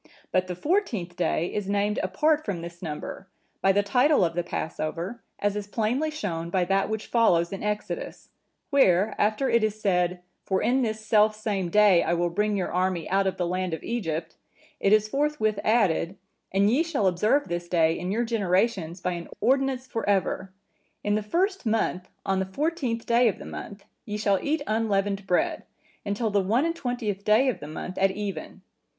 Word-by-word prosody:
But 185 0 +1
the 180 - -4
fourteenth 220 - -1
day 175 -1 0
is 205 -2 -3
named 205 +1 +1
apart 300 +12 +1
from 180 -5 -4
this 170 0 -9
number, 160 +3 -6 0.3
by 195 - +5
the 205 +1 +2
title 250 - +4
of 165 - -2
the 175 - 0
Passover, 170 +6 -4 0.2
as 205 0 0
is 205 -1 -4
plainly 235 +9 0
shown 170 - -4
by 180 0 +1
that 195 +2 +1
which 220 0 -3
follows 175 -7 +2
in 195 - -5
Exodus:(959) 210 - -6
where, 205 -7 +4
after 215 +6 +2
it 235 -3 +3
is 215 0 -1
said, 180 -3 +1 0.2
'For 190 -1 0
in 260 +2 +2
this 220 -2 -2
self 215 0 +4
same 205 -4 -2
day 200 -2 +5
I 170 - +1
will 175 0 0
bring 210 +3 0
your 185 - -2
army 180 -1 0
out 195 0 +3
of 190 - -2
the 180 - 0
land 180 -1 -1
of 160 - -12
Egypt;' 165 -8 -3 0.4
it 195 - +2
is 215 0 +5
forthwith 275 -5 0
added, 195 -5 +2 0.3
'And 200 +2 +3
ye 265 +7 +3
shall 325 -11 0
observe 210 +11 +2
this 175 0 -3
day 165 -2 +3
in 180 - -3
your 230 +4 +1
generations 190 -5 0
by 180 - -1
an 170 -1 -5
ordinance 265 0 +1
for 225 -4 -3
ever. 190 -1 0 0.5
In 205 - +1
the 215 - +1
first 375 - 0
month, 215 -5 -1 0.2
on 195 -1 +1
the 190 - 0
fourteenth 255 - -2
day 235 +1 +4
of 210 - 0
the - - -10
month, 200 -1 -8 0.2
ye 210 0 -3
shall 200 -2 +2
eat 295 0 -1
unleavened 205 -3 0
bread, 180 - +1 0.4
until 210 +2 -1
the 200 0 +3
one 225 - +2
and 335 0 -1
twentieth 245 - -3
day 220 +6 +4
of 255 - -2
the 145 - -8
month 170 +4 -6
at 195 0 +4
even. 200 0 -6
205 Hz, 195 wpm, -26 LUFS, 180-230 Hz, 0.5 s, by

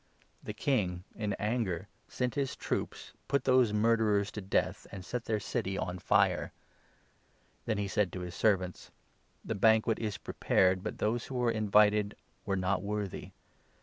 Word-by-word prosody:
The 105 - -6
king, 95 -9 0
in 105 -2 -2
anger, 105 -4 -1 0.2
sent 125 -1 -2
7 145 - 0
his 135 - -2
troops, - - -4
put 140 +1 +1
those 130 -4 +4
murderers 105 -1 +2
to 105 - -6
death, 95 - -1
and 95 -2 -8
set 120 -1 -4
their 110 -2 0
city 100 -3 -2
on 90 0 -3
fire. - - +2 1.2
Then 110 -2 0
he 100 -1 -1
said 100 -2 +1
to 90 - -4
his 90 -1 -6
servants 95 -4 0 0.3
' - - -35
The - - -2
banquet 110 +2 +3
is 105 -3 -3
pre - - -8
8 - - -37
pared, 95 0 +3
but - - -4
those 115 +3 0
who 135 - -6
were 120 -2 +2
invited 105 -1 +3 0.3
were 95 -1 +1
not 95 0 0
worthy. 100 -1 -4
105 Hz, 175 wpm, -31 LUFS, 95-115 Hz, 1.2 s, those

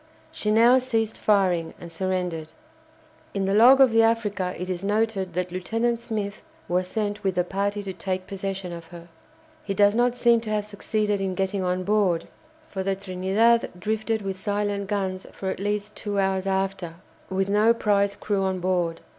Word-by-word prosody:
She 210 - -3
now 235 +4 +6
ceased 225 -4 -1
firing 185 -6 +2
and 170 -1 -10
surrendered. 180 -2 -2 0.9
In 195 -1 0
the 195 - +1
log 245 +6 +7
of 265 -3 +7
the 225 0 +5
"Africa" 210 -5 +1
it 180 - -5
is 185 0 -3
noted 205 -3 0
that 180 0 -2
Lieutenant 225 +6 -1
Smith 210 -3 -4 0.3
was 180 +1 0
sent 210 0 -3
with 190 -2 -1
a 180 - +3
party 200 +3 -2
to 190 -1 -5
take 185 0 -3
possession 195 -2 -4
of 170 -1 -9
her. 170 0 -12 0.5
He 195 - -3
does 205 0 +5
not 245 +1 +2
seem 235 -2 +4
to 225 - -6
have 210 -1 0
succeeded 210 0 -1
in 190 -1 -2
getting 195 +1 -1
on 180 0 -1
board, 195 -4 +1 0.4
for 190 - -4
the 195 0 0
"Trinidad" 195 +5 +2
drifted 220 +2 -1
with 190 -1 -4
silent 205 0 -1
guns 190 -2 -2
for 190 -1 -3
at - - -6
least 205 +1 -2
two 205 -2 -4
hours 190 0 0
after, 190 -3 -2 0.3
with 190 0 0
no 210 +3 +4
prize 200 -3 +1
crew 200 -1 -1
on 190 -1 -1
board. 175 -2 -1
195 Hz, 180 wpm, -25 LUFS, 185-215 Hz, 0.9 s, log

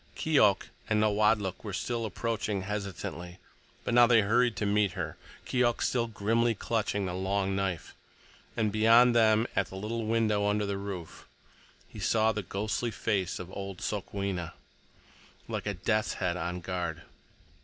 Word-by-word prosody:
Keok 125 -11 +3 0.2
and 110 -1 +2
Nawadlook 105 -2 +2
were 100 -4 -4 0.3
approaching 110 -3 -2
hesitatingly, 95 -3 -5 0.5
but - - -2
now 120 0 +7
they 115 -2 +6
hurried 120 +3 +2
to 105 - -2
meet 100 -2 +2
her, 85 -5 -4 0.3
Keok 120 -2 +1
still 120 -2 +1
grimly 115 +2 +1
clutching 105 -2 -1
the 90 - -3
long 95 +1 -1
knife; 95 -3 -2 0.6
and 110 -2 +1
beyond 115 +3 +5
them, 110 -1 +4
at 95 - +1
the 95 - -10
little 110 +3 -3
window 110 -2 +2
under 105 0 +1
the 100 -1 -2
roof, 95 -4 -7 0.6
he - - -11
saw 110 0 +2
the 105 -1 -3
ghostly 105 +5 -2
face 100 -5 -1
of 90 0 -8
old 100 -1 -6
Sokwenna, 100 -4 -3 0.9
like - - -4
a 100 - -1
death's 110 +5 0
head 85 -1 -1
on 90 +1 -3
guard. 85 -3 -4
105 Hz, 150 wpm, -29 LUFS, 95-110 Hz, 0.9 s, now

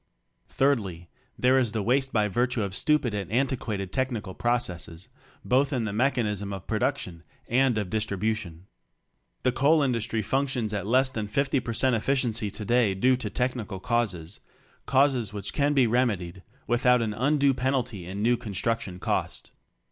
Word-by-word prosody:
Thirdly, 100 -12 0 0.3
there 130 +1 +4
is 120 -4 +1
the 110 -2 -1
waste 130 +4 +1
by 105 -2 +2
virtue 120 +3 0
of 100 -1 -4
stupid 135 +1 +2
and 100 -2 -4
anti 130 +3 +1
quated 100 -6 -4
technical 120 -7 -2
processes 90 -8 -2 0.2
— - - -28
both 135 +3 +2
in 125 -5 -1
the 100 - -3
mechanism 105 -5 0
of 95 -2 -7
produc 130 +6 0
tion 85 -9 -7 0.3
and 125 -1 +2
of 105 -4 -2
distribution. 105 -4 -2 0.8
The 125 - +3
coal 145 +4 +3
industry 115 -4 -1
functions 130 -1 -1
at 100 -2 -3
less 130 +3 +3
than 110 -4 -3
50 140 +5 +1
per 120 -2 -4
cent 130 +2 +2
efficiency 120 -2 0
today 110 0 +1
due 130 +7 +3
to 115 -4 -4
technical 120 -5 -2
causes 105 -6 -2 0.2
— - - -34
causes 130 -6 +2
which 100 -2 -4
can 145 0 +1
be 135 -3 +5
remedied 105 -7 0 0.2
without 125 0 +3
an 110 -2 -2
undue 140 +4 +2
penalty 125 -8 -2
in 100 +3 -4
new 120 +1 +3
construction 110 -3 -3
cost. - - -3
115 Hz, 165 wpm, -27 LUFS, 100-130 Hz, 0.8 s, be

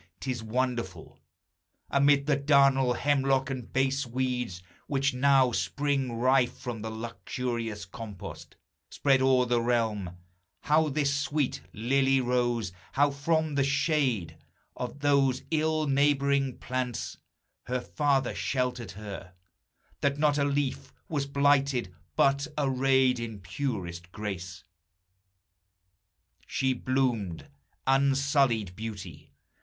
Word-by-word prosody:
'T 130 - -3
is 120 -3 -4
wonderful 115 -6 -3 0.7
Amid 140 0 +4
the 150 -1 +3
darnel, 140 -2 +4
hemlock, 135 0 +1
and 125 -4 -6
base 135 +1 +1
weeds, 125 -7 -2 0.2
Which 140 -1 +1
now 135 -1 +4
spring 140 -1 -1
rife 125 +1 +2
from 120 -4 -5
the 110 - -4
luxurious 115 -1 -4
compost 100 0 -9 0.3
Spread 135 -2 +2
o'er 130 -1 +4
the 120 -1 +1
realm, 110 -7 -1 0.4
how 155 +1 +3
this 140 0 +1
sweet 140 0 -1
lily 135 +4 +2
rose, 120 -5 0 0.2
How 145 +1 +3
from 155 +2 0
the 140 -1 +2
shade 140 - 0 0.4
of 125 +3 -6
those 140 -3 +2
ill 155 0 +1
neighboring 140 -1 +2
plants 125 -2 -3 0.5
Her 125 +1 -1
father 135 0 0
sheltered 125 -5 -2
her, 100 -3 -8 0.6
that 140 0 +1
not 150 -1 +2
a - - +3
leaf 140 -1 -1 0.2
Was 145 -3 -1
blighted, 140 -7 +2 0.2
but, 140 +1 +3
arrayed 130 -2 +3
in 110 -3 -5
purest 90 -4 -4
grace, 95 -4 -6 1.8
She 130 -1 +1
bloomed 125 - -1 0.4
unsullied 135 - +2
beauty. 110 -2 -8
130 Hz, 110 wpm, -28 LUFS, 115-140 Hz, 1.8 s, Amid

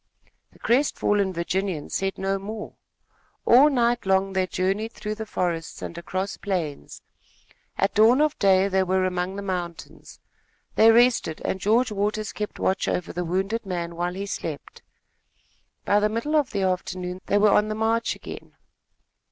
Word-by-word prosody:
The - - -21
crestfallen 210 -6 +1
Virginian 175 -1 -2
said 195 0 -2
no 195 0 -1
more. 210 +2 -7 0.7
All 265 +5 +7
night 240 -5 +1
long 190 0 +2
they 190 -1 +1
journeyed 195 +5 -1
through 210 0 -4
the 220 0 -6
forests 170 -5 -3
and - - -6
across 185 +3 -4
plains. 160 - -4 0.7
At 195 - +1
dawn 225 +5 +5
of 305 0 +2
day 195 -1 +4
they 190 -1 +1
were 185 0 +1
among 180 +1 -2
the 200 - -5
mountains. 175 -3 -6 0.5
They 225 - +6
rested 235 -8 +3
and 190 - -1
George 225 +5 +2
Waters 210 +1 -2
kept 210 0 -5
watch 190 - 0
over 180 - -2
the 180 - -2
wounded 190 +6 -1
man 170 -3 -4
while 175 +1 -2
he 195 +1 -4
slept. 160 -6 -6 1.0
By 205 - +4
the 210 0 +2
middle 230 +8 -2
of 295 -4 +2
the 200 -2 -2
afternoon, 185 0 -2
they 205 - +2
were 205 0 +5
on 210 - +3
the 215 - -3
march 225 +1 0
again. - - -10
195 Hz, 160 wpm, -24 LUFS, 185-215 Hz, 1.0 s, All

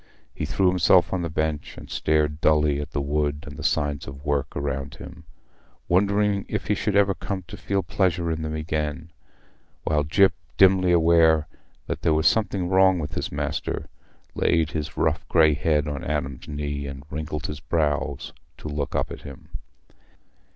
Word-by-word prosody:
He - - -3
threw 95 - +1
himself 90 0 +4
on 95 - 0
the 85 - -2
bench 75 -1 -2
and - - -10
stared 75 0 0
dully 75 -2 +3
at 75 - -6
the 75 - -3
wood 75 +1 -1
and 75 -1 -9
the 80 - -8
signs 75 -3 0
of 70 +1 -10
work 70 -2 -1
around 70 -1 -3
him, 85 -2 -11 0.6
wondering 100 +2 +2
if - - -2
he - - +4
should 100 +1 -1
ever 100 -1 +4
come 95 0 -5
to - - -8
feel 100 -1 -1
pleasure 85 -3 0
in 80 0 -2
them 80 0 -3
again, 80 0 -3 0.7
while 75 -1 +1
Gyp, 95 +6 +4 0.3
dimly 95 -1 +5
aware 80 -2 +4 0.4
that - - -4
there 80 - +2
was 80 +1 +1
something 100 -4 +2
wrong 95 0 +4
with 75 -4 -4
his - - -3
master, - - -3 0.4
laid 80 -2 +1
his 75 -3 -4
rough - - 0
grey 80 -2 +5
head 75 0 +1
on 75 -2 -4
Adam's 70 -2 -3
knee 75 -1 -4
and 70 0 -8
wrinkled 75 0 -4
his 75 -1 -5
brows 75 -4 -1 0.2
to - - -8
look 75 -2 -3
up - - -1
at - - -7
him. 70 -2 -11
80 Hz, 175 wpm, -24 LUFS, 75-90 Hz, 0.7 s, dimly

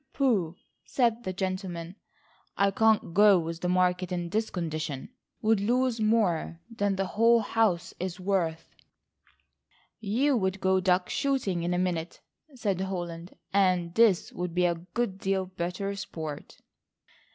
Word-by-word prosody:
"Pooh," 205 - +1 0.3
said 240 -2 0
that 185 0 -4
gentleman, 185 -2 -4 0.6
"I 200 0 +3
can't 220 -4 +2
go 205 +1 +6
with 165 0 -4
the 180 - -1
market 180 0 +1
in 175 -1 -2
this 220 +1 0
condition,—would 170 - -3
lose 245 +3 +1
more 215 -7 +1 0.2
than 205 -2 0
the 195 0 -1
whole 230 +4 +4
house 200 -5 0
is 185 0 -4
worth." 180 -4 -1 1.3
"You 240 +7 +1
would 190 -2 -1
go 190 0 +2
duck 180 -1 +2
shooting 255 -11 -1
in 175 +1 -1
a - - 0
minute," 175 -2 -2 0.4
said 200 -6 -1
Holland, 175 -2 -5 0.2
"and 180 -3 +2
this 215 -4 +3
would 175 -1 -4
be 180 0 +3
a 175 - +3
good 190 +4 -4
deal 195 -1 0
better 185 +2 -4
sport." 160 -6 -7
190 Hz, 140 wpm, -28 LUFS, 175-215 Hz, 1.3 s, go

